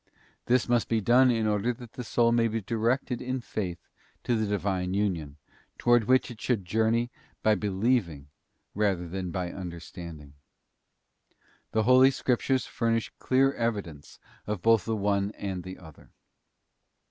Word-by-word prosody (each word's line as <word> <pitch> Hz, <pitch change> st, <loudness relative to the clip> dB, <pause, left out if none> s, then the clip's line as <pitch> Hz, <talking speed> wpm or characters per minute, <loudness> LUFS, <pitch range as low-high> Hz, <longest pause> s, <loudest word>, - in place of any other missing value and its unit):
This 125 Hz, -1 st, +3 dB
must 120 Hz, -1 st, +1 dB
be 115 Hz, -, +2 dB
done 125 Hz, +5 st, +5 dB
in 115 Hz, -2 st, +1 dB
order 105 Hz, +2 st, +1 dB
that 120 Hz, -2 st, -12 dB
the 125 Hz, -, -6 dB
soul 115 Hz, 0 st, +2 dB
may 115 Hz, -1 st, +3 dB
be 115 Hz, 0 st, -2 dB
directed 115 Hz, +4 st, -1 dB
in 130 Hz, +1 st, -2 dB
Faith 95 Hz, -7 st, -5 dB, 0.4 s
to 120 Hz, -, +1 dB
the 110 Hz, -1 st, 0 dB
Divine 95 Hz, -2 st, -1 dB
union, 85 Hz, -8 st, -1 dB, 0.4 s
towards 120 Hz, -3 st, +3 dB
which 130 Hz, 0 st, +3 dB
it 115 Hz, -, -11 dB
should 110 Hz, -7 st, 0 dB
journey 110 Hz, +5 st, +1 dB, 0.3 s
by 110 Hz, -, +5 dB
be 105 Hz, -1 st, -1 dB
lieving 95 Hz, -, 0 dB, 0.5 s
rather 95 Hz, -4 st, 0 dB
than 90 Hz, +1 st, -4 dB
by 90 Hz, +1 st, -3 dB
understanding. 85 Hz, -4 st, -8 dB, 1.4 s
The 110 Hz, -, +2 dB
Holy 130 Hz, +3 st, +7 dB
Scriptures 130 Hz, 0 st, 0 dB
furnish 115 Hz, -1 st, -1 dB
clear 135 Hz, +1 st, +3 dB
evidence 100 Hz, -, -4 dB, 0.3 s
of 105 Hz, -3 st, -3 dB
both 115 Hz, -1 st, +4 dB
the 115 Hz, -, -1 dB
one 100 Hz, 0 st, 0 dB
and 95 Hz, -3 st, -4 dB
the 95 Hz, +1 st, -8 dB
other. 80 Hz, -4 st, -15 dB
110 Hz, 150 wpm, -28 LUFS, 95-120 Hz, 1.4 s, Holy